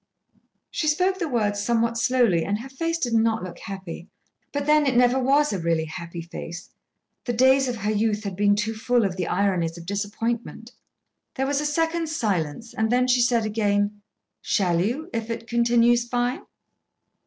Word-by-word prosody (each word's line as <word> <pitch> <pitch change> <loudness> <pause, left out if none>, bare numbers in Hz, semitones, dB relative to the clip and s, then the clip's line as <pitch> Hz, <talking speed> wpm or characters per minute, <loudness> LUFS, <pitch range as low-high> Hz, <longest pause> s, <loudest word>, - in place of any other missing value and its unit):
She 310 - -2
spoke 365 +5 +1
the 335 -5 -2
words 205 -5 0
somewhat 235 +1 +1
slowly, 230 -8 +2
and 205 +1 -1
her 265 - -9
face 330 +5 -2
did 245 -7 -2
not 225 -1 +2
look 180 -2 -8
happy. 190 -3 -8 0.4
But, 285 0 -2
then, 300 -1 +4
it 255 -2 +2
never 250 +1 +4
was 280 +1 +3
a 195 - -2
really 165 -1 0
happy 170 +1 -7
face. 170 +1 -8 0.5
The 240 - -1
days 260 +3 +4
of 245 - -2
her 210 -1 -2
youth 215 0 0
had 200 -3 -4
been 205 +1 +3
too 210 +2 -1
full 235 +1 +1
of 185 -2 -2
the 180 -2 -2
ironies 180 -4 0
of 170 - -10
disappointment. 220 +4 -3 0.6
There 265 - 0
was 285 +1 0
a 300 - 0
second's 325 +1 -1
silence, 200 - -2
and 220 +1 0
then 250 +1 +3
she 250 -1 +3
said 235 -2 +2
again: 205 -1 0 0.4
"Shall 175 -4 +1
you, 265 - -2
if 225 0 -3
it 230 0 -4
continues 235 0 +3
fine?" 245 +2 -2
230 Hz, 180 wpm, -24 LUFS, 200-255 Hz, 0.6 s, then